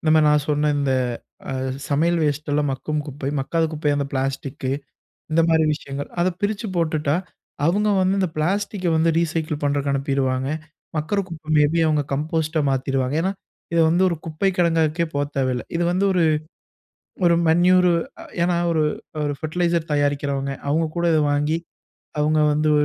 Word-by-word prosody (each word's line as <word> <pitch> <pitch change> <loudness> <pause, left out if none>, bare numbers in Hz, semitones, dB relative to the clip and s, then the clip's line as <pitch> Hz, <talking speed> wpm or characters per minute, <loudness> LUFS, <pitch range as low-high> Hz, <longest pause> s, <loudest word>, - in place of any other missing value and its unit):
இந்த 155 - +1
மாரி 155 -1 +5
நான் 150 -1 +3
சொன்ன 150 0 +2
இந்த 140 -2 +1 0.6
அ - - -3 0.4
சமையல் 165 +4 +2
வேஸ்டல்லாம் 145 0 0
மக்கும் 150 +3 -2
குப்பை. 140 -1 -5
மக்காத 165 +5 0
குப்பை 150 -1 0
அந்த 140 - 0
பிளாஸ்டிக் 135 0 -3 0.7
இந்த 165 +1 +4
மாரி 160 -1 +4
விஷயங்கள். 140 -1 -6
அத 175 - +3
பிரிச்சுப் 205 -1 -2
போட்டுட்டா 155 -3 +1 0.5
அவங்க 205 +5 +2
வந்து 185 +1 +2
இந்த 185 - +2
பிளாஸ்டிக 195 +3 -1
வந்து 165 +1 +3
ரீசைக்கிள் 160 -2 -1
பண்றதுக்கு 145 -1 0
அனுப்பிருவாங்க. 135 -1 0 0.5
மக்குற 160 +7 0
குப்பை 160 -1 -9
மே 150 - +6
பி 170 - +2
அவங்க 150 -2 +2
கம்போஸ்டா 155 +2 0
மாத்திருவாங்க. 135 +1 0
ஏன்னா 190 +2 0 0.4
இத 165 - +3
வந்து 175 +3 +3
ஒரு 170 - -1
குப்பை 165 +5 0
கிடங்குக்கே 165 -1 +2
போக 145 0 +1
தேவைல்லை. 130 -3 0
இது 170 - +1
வந்து 190 +3 +1
ஒரு 180 -3 +2 1.0
ஒரு 170 -1 +5
மேன்யூர் 180 +2 +5 0.3
அ - - -8 0.2
ஏன்னா 175 0 +2 0.2
ஒரு 160 -2 +2 0.4
ஒரு 145 0 -1
ஃபெர்டிலைசர் 170 +1 0
தயாரிக்கிறவங்க 140 -1 0 0.2
அவங்க 160 +2 +2
கூட 170 0 0
இத 155 - +4
வாங்கி, 150 +3 +1 0.6
அவங்க 155 +1 +2
வந்து 150 +1 +2
155 Hz, 160 wpm, -22 LUFS, 145-170 Hz, 1.0 s, மே